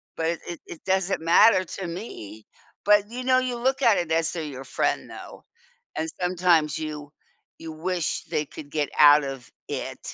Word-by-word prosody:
but 160 0 -1
it 170 0 -2
it 170 - -7
it 165 - -10
doesn't 190 0 0
matter 185 +4 +5
to 185 +1 -6
me." 110 - -8 0.4
But, 205 0 +4
you 250 +2 -6
know, 255 0 +4
you 255 -1 -2
look 260 +2 0
at 230 -5 +5
it 165 -2 -2
as 160 0 +2
to 165 -2 -4
your 135 -2 -7
friend - - -1
though, - - -11 0.5
and 160 - -1
sometimes 175 -4 +2
you 150 -2 -6 0.5
you 165 -1 -8
wish 175 +1 -2
they 155 -2 -2
could 145 0 -11
get 145 0 -1
out 145 0 +8
of 135 -2 -7 0.2
it. - - -5
165 Hz, 185 wpm, -25 LUFS, 150-195 Hz, 0.5 s, out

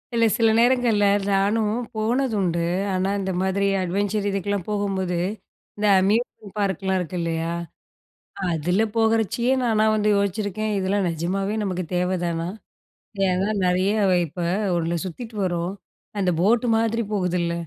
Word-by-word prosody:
இல்ல 230 0 +4
சில 225 -2 +4
நேரங்கள்ல 235 -3 +3 0.3
நானும் 210 +2 +2 0.2
போனது 235 +4 0
உண்டு. 170 -3 0 0.3
ஆனா 185 +1 0
இந்த 190 -1 -2
மாதிரி 195 +1 +1
அட்வென்ச்சர் 200 +3 -1
இதுக்கெல்லாம் 195 -1 -2
போகும்போது 195 -4 -1 0.6
இந்த 210 - -1
அம்யூஸ்மென்ட் 210 0 -1
பார்க்லாம் 190 -1 0
இருக்கு 180 +1 -4
இல்லையா, 165 0 -2 1.0
அதில 175 +6 +1
போகச்சயே 225 +2 +2
நானா 220 -2 +2
வந்து 210 0 +1
யோசிச்சிருக்கேன். 205 +1 -1
"இதெல்லாம் 195 0 0
நிஜமாகவே 190 +5 -2
நமக்கு 185 -2 -2
தேவைதானா?" 175 -2 -1 0.8
ஏன்னா 185 +2 +1 0.2
நிறைய 180 +2 +2 0.4
இப்போ 170 +3 -5 0.3
ஒண்ணுல 170 0 -1
சுத்திட்டு 220 +5 -8
வரோம் 175 0 -1 0.5
அந்த 185 -2 +2
போட் 225 +6 +3
மாதிரி 230 +1 +1
போகுதுல்ல 180 -3 0
195 Hz, 120 wpm, -23 LUFS, 180-215 Hz, 1.0 s, இல்ல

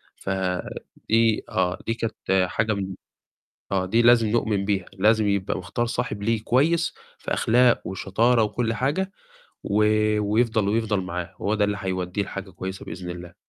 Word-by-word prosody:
فدي 95 +4 -1
آه، 90 -1 0
دي 115 - +1
كانت 95 -5 0
حاجة 110 +3 0
من 95 -2 -4 0.8
آه، 95 -1 +1
دي 115 +6 +2
لازم 120 -1 +5
نؤمن 105 -3 0
بيها، 100 -3 0
لازم 105 +2 +3
يبقى 100 -1 0
مختار 95 +7 -2
صاحب 105 -3 -3
ليه 110 0 0
كويس 165 +8 +2 0.2
في - - -4
أخلاق 120 +1 +4
وشطارة 110 +5 +2
وكل 115 +2 -1
حاجة 150 - -1 0.5
و 100 - -1 0.6
ويفضل 110 -2 +2
ويفضل 110 -2 +1
معاه، 90 -2 -5
هو 105 - 0
ده 105 -1 +2
اللي 105 0 0
هيودّيه 95 +1 -2
لحاجة 100 -1 -7
كويسة 95 +2 -6
بإذن 90 +1 -7
الله. 90 0 -8
105 Hz, 150 wpm, -24 LUFS, 95-115 Hz, 0.8 s, لازم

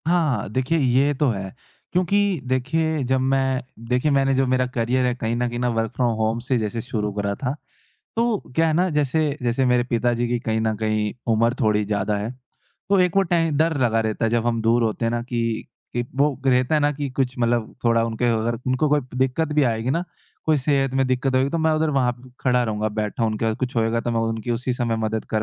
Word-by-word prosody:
हाँ, 160 - +1
देखिए 130 +7 0
ये 135 +2 +3
तो 145 +1 +1
है, 95 -4 -4 0.4
क्योंकि 190 +1 +2
देखिए 145 +4 0
जब 130 +1 +2
मैं 135 0 +1 0.3
देखिए 125 +4 +2
मैंने 135 -1 +3
जो 135 0 +2
मेरा 130 0 +2
करियर 125 +2 +1
है 125 - +1
कहीं 115 -1 -2
न 120 +1 0
कहीं 120 0 -4
ना 125 0 +1
वर्क 115 -1 -1
फ्रॉम 120 -2 +1
होम 110 +1 0
से 130 0 +1
जैसे 110 +1 -2
शुरू 110 -4 -3
करा 100 0 -1
था, 125 +3 -2 0.6
तो 230 -2 +2 0.2
क्या 165 0 +3
है 160 - +2
ना 180 +3 +2
जैसे 150 0 +1
जैसे 120 +2 +1
मेरे 125 -1 +3
पिताजी 120 0 +1
की 120 0 0
कहीं 110 -2 -1
न 110 -1 0
कहीं 110 -1 -1 0.2
उम्र 115 +2 +2
थोड़ी 105 -1 +2
ज़्यादा 105 0 -1
है, 105 +3 -3 0.6
तो 200 - +5
एक 180 0 +2
वो 195 - +6
टै 165 -3 +1
डर 160 +1 +2
लगा 115 -3 +2
रहता 110 +1 -1
है, 115 - +2
जब 120 0 +1
हम 115 -1 +1
दूर 115 +2 +3
होते 115 +1 -1
हैं 115 - +1
ना 120 0 -1
कि 115 -2 -2 0.3
एक 120 0 -1
वो 140 -1 +2
रहता 130 +2 +3
है 155 - +3
ना 145 0 +3
कि 145 0 -4
कुछ 130 -1 -1
मतलब 120 -1 0
थोड़ा 115 -1 +3
उनके 115 +1 -2
अगर 115 +1 -1
उनको 130 +4 +1
कोई 150 0 +3 0.2
दिक्कत 135 +4 0
भी 150 - +4
आएगी 115 0 0
ना, 170 +5 0 0.4
कोई 155 -1 +3
सेहत 135 -1 +1
में 135 0 +2
दिक्कत 130 +1 0
होएगी 130 +2 +2
तो 165 - -1
मैं 160 0 +2
उधर 155 0 +1
वहाँ 130 -4 +2 0.3
खड़ा 125 -1 +2
रहूँगा, 110 -1 -1
बैठा 105 +1 -2
उनके 110 +1 -1
साथ, 110 - +1
कुछ 125 +1 -4
होएगा 115 0 +1
तो 120 - -2
मैं 115 -1 0
उनकी 115 +1 -2
उसी 125 +2 -1
समय 120 -2 -1
मदद 110 0 -2
कर 110 -1 +1
125 Hz, 230 wpm, -23 LUFS, 115-140 Hz, 0.6 s, वो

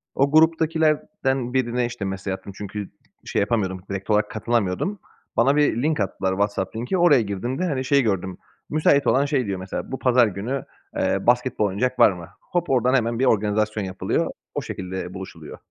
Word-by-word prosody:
O 140 +1 +2
gruptakilerden 155 -4 +2
birine, 125 -1 +1
işte, 120 -4 -5
mesaj 95 0 -3
attım 95 +1 -8
çünkü 105 0 -6 0.4
şey - - -1
yapamıyordum, 100 -4 0
direkt 100 +1 -5
olarak 105 0 +2
katılamıyordum. 115 - -1 0.4
Bana 135 +5 +4
bir 145 -5 +2
link 155 -4 +1
attılar, 95 -1 -1
WhatsApp 100 0 -1
linki, 125 +11 -1
oraya 170 -7 +5
girdiğimde, 115 - -3
hani, 135 -6 -1
şey 140 +1 +4
gördüm, 95 -5 -1 0.3
müsait 145 -2 +3
olan 135 +5 +4
şey 140 -4 0
diyor 100 -2 -3
mesela, 95 +1 -5
"Bu 130 - -4
pazar 125 -2 +4
günü, 110 +7 -4 0.3
eee, - - 0
basketbol 125 -2 +2
oynayacak 125 +6 -1
var - - +7
mı?" 85 -2 -9
Hop 175 -1 -2
oradan 125 0 +3
hemen 115 -2 +1
bir 135 - +3
organizasyon 105 -1 +1
yapılıyor. 95 0 -1 0.2
O - - -1
şekilde 95 -1 -5
buluşuluyor. 90 -5 -9
115 Hz, 170 wpm, -23 LUFS, 100-135 Hz, 0.4 s, var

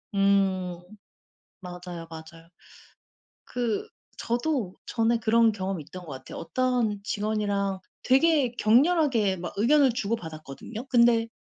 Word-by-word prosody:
음 190 -3 +2 0.8
맞아요, 180 -2 -8
맞아요. 165 +1 -11 1.0
그 235 -4 -2 0.3
저도 240 - -1
전에 230 0 +1
그런 230 0 +3
경험이 190 -4 -4
있던 180 +5 -10
것 155 - -9
같아요. 130 0 -9
어떤 240 -1 0
직원이랑 205 -2 -1 0.2
되게 270 -1 +3
격렬하게 245 - +3
막 175 0 -6
의견을 270 +4 +4
주고받았거든요. 200 - -5
근데 235 -2 +4
210 Hz, 250 characters per minute, -26 LUFS, 185-240 Hz, 1.0 s, 의견을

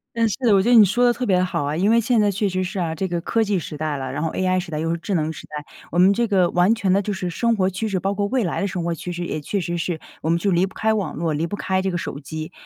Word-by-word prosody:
嗯， 230 -1 +2
是 215 - -1
的， 230 -6 +4
我 195 - +5
觉 205 - -1
得 - - +5
你 220 - +9
说 240 +6 +2
得 240 - +4
特 250 - -5
别 190 -6 +3
好 180 - -1
啊， 145 +2 -2
因 200 +5 +3
为 230 0 +4
现 230 +1 +2
在 205 -1 +3
确 200 +1 0
实 185 0 -1
是 185 +1 -4
啊， 165 -2 -1
这 190 +4 -2
个 175 -1 -2
科 225 +6 +1
技 200 -3 0
时 155 -2 -7
代 155 -1 -2
了， 130 -2 -4
然 145 +4 -3
后 160 - 0
AI 185 0 +1
时 180 -2 -7
代， 150 - -2
又 165 +1 -1
是 170 - 0
智 195 +4 -4
能 160 -2 0
时 - - -9
代， 150 -1 -7 0.3
我 175 - 0
们 185 +2 +6
这 235 +4 +1
个 190 -5 +2
完 180 +5 +3
全 205 -5 0
的 195 - +4
就 205 +1 -2
是 185 -2 -3
生 230 +7 +1
活 190 -2 +1
趋 195 +4 -3
势， 190 -3 -1
包 195 +2 -1
括 205 0 0
未 245 +3 0
来 175 - -2
的 - - 0
生 180 -3 -3
活 170 - -1
趋 180 - -6
势， 175 0 -4
也 - - -3
确 195 +7 -2
实 175 0 -3
是 170 -1 -2 0.2
我 160 - -1
们 170 - +2
就 200 +3 0
离 180 0 +3
不 195 - -10
开 220 0 +1
网 200 -6 -2
络， 165 0 -1
离 155 +3 -1
不 205 - -4
开 190 -2 -1
这 190 - 0
个 175 - -2
手 140 - -5
机。 155 +3 -7
185 Hz, 385 characters per minute, -22 LUFS, 170-205 Hz, 0.3 s, 你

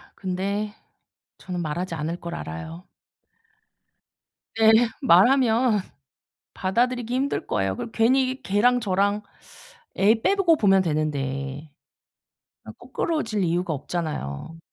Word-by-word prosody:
근데 200 +3 -3 0.6
저는 180 -2 -5
말하지 170 +2 -3
않을 160 +2 -3
걸 170 0 -6
알아요. 80 +2 -7 1.7
네. 220 0 +6 0.3
말하면 240 +1 +4 0.7
받아들이기 240 +5 -1
힘들 275 +2 -1
거예요. 95 -1 -1
그리고 230 - -6
괜히 260 +4 +2
걔랑 235 +6 +3
저랑 200 -1 0 0.8
애 220 +3 +3
빼고 385 -5 +3
보면 195 -4 +4
되는데. 145 -2 -3 1.0
어 - - -8
껄끄러워질 230 - -2
이유가 175 0 0
없잖아요. 155 - -5
195 Hz, 230 characters per minute, -24 LUFS, 160-235 Hz, 1.7 s, 네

